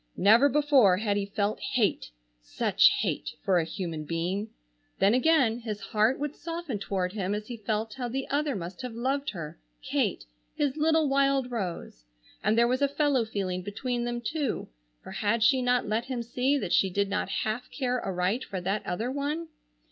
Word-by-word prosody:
Never 225 +8 +6
before 275 -9 +4
had 205 0 0
he 200 -1 -1
felt 200 +1 -1
hate, 225 -6 0 0.3
such - - +4
hate, 155 - -2
for 190 -4 +3
a - - +1
human 165 -2 -4
being. 175 +7 -2 0.5
Then 200 +3 +4
again 255 -4 +3
his 215 -3 -5
heart 215 +5 +1
would 295 0 -3
soften 330 -9 -5
toward 190 -2 -2
him 200 -1 -1
as 210 0 -5
he 240 +1 -7
felt 215 0 -2
how 250 0 -4
the 265 +3 -3
other 290 -1 0
must 175 -1 -6
have 250 -3 -6
loved 270 +4 -1
her, 165 - -7 0.2
Kate, - - -1 0.3
his 285 -2 0
little 315 0 +3
wild 275 -2 +2
rose! 180 - -5 0.4
and 215 +2 +2
there 235 0 +5
was 255 +3 0
a 280 - +4
fellow 280 -4 +1
feeling 190 -4 -3
between 240 +6 -3
them 240 0 -3
too, 295 0 -2 0.3
for - - -9
had 215 +2 0
she 255 +4 +4
not 245 -1 +1
let 220 +2 0
him 255 -3 -3
see 255 +4 +1
that 195 -10 -2
she 195 - +4
did 200 +2 0
not 200 +1 -2
half 220 +3 -2
care 250 -3 -2
aright 190 +5 -1
for 190 - -5
that 195 +4 -2
other 220 +8 -2
one? 295 +4 -3
230 Hz, 185 wpm, -28 LUFS, 200-265 Hz, 0.5 s, Never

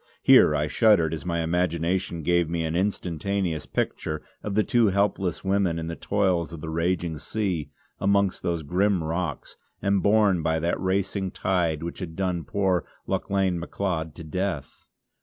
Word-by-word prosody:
Here 75 - +7
I 75 0 +1
shuddered 85 -2 +3
as 80 +2 -5
my 85 -1 0
imagination 85 0 0
gave 85 0 +2
me 85 -1 -1
an 80 0 -2
instantaneous 90 -2 -1
picture 75 -1 -2 0.2
of 100 -2 -4
the 110 - +4
two 120 -3 +3
helpless 95 -3 0
women 95 -3 +1
in 80 - -3
the 85 0 -4
toils 95 -5 0
of 85 - -7
the 80 +1 -5
raging 85 -1 -1
sea 95 -8 -2 0.3
amongst 100 0 +2
those 85 -2 -1
grim 90 +3 +1
rocks 85 +3 -3 0.2
and 100 -1 +1
borne 100 -4 +3
by 80 0 +1
that 85 +2 -1
racing 95 0 0
tide 85 -4 0
which 85 - -5
had 85 -4 -6
done 90 -4 -1
poor 95 +1 +1 0.2
Lauchlane 95 -3 0
Macleod 85 -3 -3
to 85 - -8
death. 90 -2 -4
90 Hz, 160 wpm, -25 LUFS, 80-95 Hz, 0.3 s, Here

